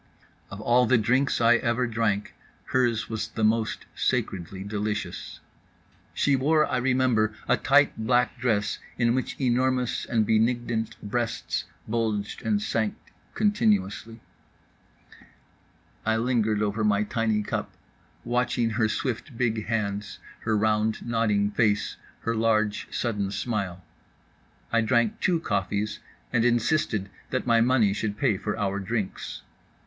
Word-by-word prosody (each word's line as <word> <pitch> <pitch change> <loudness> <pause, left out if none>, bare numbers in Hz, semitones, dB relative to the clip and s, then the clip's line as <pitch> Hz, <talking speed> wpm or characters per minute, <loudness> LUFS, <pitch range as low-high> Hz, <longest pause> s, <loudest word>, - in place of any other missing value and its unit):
Of 95 - -8
all 120 +2 +3
the 130 - +5
drinks 125 +5 +2
I 120 +1 +5
ever 120 +1 0
drank, 110 -3 -1 0.4
hers 115 -4 +2
was 110 -1 -3
the 110 - -4
most 110 0 +1
sacredly 95 +1 -2
delicious. 105 -2 -4 0.7
She 140 - +3
wore, 150 +4 +3
I 130 - -1
remember, 125 -4 +2
a - - +4
tight 145 +1 +4
black 125 +2 +1
dress 105 -4 0 0.2
in 120 -1 +3
which 130 0 -2
enormous 130 -1 +1
and 110 -3 +1
benignant 115 0 +1
breasts 115 +2 -2 0.2
bulged 110 -2 -1
and 210 -1 +1
sank 110 - -1 0.4
continuously. 115 - +1 1.8
I 110 0 +1
lingered 110 -3 +1
over 105 +1 -1
my 105 -1 +3
tiny 110 -1 0
cup, - - -3 0.5
watching 120 -1 0
her 110 -1 +1
swift 125 +3 -3
big 115 -3 0
hands, 105 -3 -2 0.2
her 110 -2 0
round 110 +1 +1
nodding 105 -3 +1
face, 105 -1 +1 0.2
her 115 - -1
large 110 -2 +1
sudden 105 -5 -1
smile. 100 -5 -3 0.9
I 115 - +3
drank 120 -1 +1
two 175 -2 +2
coffees, 105 - -2 0.3
and 115 - +3
insisted 120 -4 +1 0.2
that 130 - -2
my 115 -2 +4
money 115 -4 +3
should 105 0 -3
pay 130 -7 +2
for 105 +2 -3
our 100 -2 -1
drinks. 100 0 -4
115 Hz, 130 wpm, -26 LUFS, 105-120 Hz, 1.8 s, the